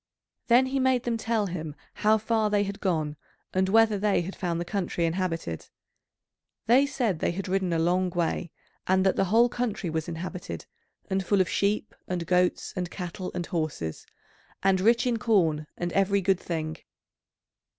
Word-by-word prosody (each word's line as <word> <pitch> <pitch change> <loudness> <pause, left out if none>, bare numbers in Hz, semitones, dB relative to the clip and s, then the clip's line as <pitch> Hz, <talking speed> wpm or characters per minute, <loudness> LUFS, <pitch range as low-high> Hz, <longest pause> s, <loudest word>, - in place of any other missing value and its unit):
Then 245 +2 +6
he 270 +1 -1
made 260 -2 +2
them 240 -1 0
tell 225 -1 0
him 160 -5 -5 0.2
how 215 +1 +3
far 220 0 +1
they 205 -1 +2
had 200 0 -5
gone, 155 -6 -1 0.4
and 190 0 +2
whether 220 -1 +4
they 205 -2 +2
had 190 +3 -6
found 170 -2 -2
the 175 - -3
country 175 -3 -1
inhabited. 165 - -2 1.0
They 260 +5 +5
said 245 - -1
they - - +1
had 195 +2 -4
ridden 190 -1 0
a 165 - +1
long 180 +3 +2
way, 170 0 -1 0.4
and 190 0 +3
that 190 - +3
the - - +2
whole 225 +6 +5
country 235 -8 -2
was 160 0 -2
inhabited, 170 - -6 0.4
and 190 0 0
full 200 +2 +2
of 185 - +3
sheep 205 +3 0
and 175 -2 -2
goats 180 +1 +1
and 180 -2 -2
cattle 180 0 -5
and 175 -1 -2
horses, 155 - -3 0.6
and 190 -1 +3
rich 230 +5 +4
in 240 -2 +1
corn 165 -10 +2
and 175 0 -2
every 195 0 +2
good 190 -1 +2
thing. 160 -3 -3
190 Hz, 175 wpm, -27 LUFS, 170-215 Hz, 1.0 s, Then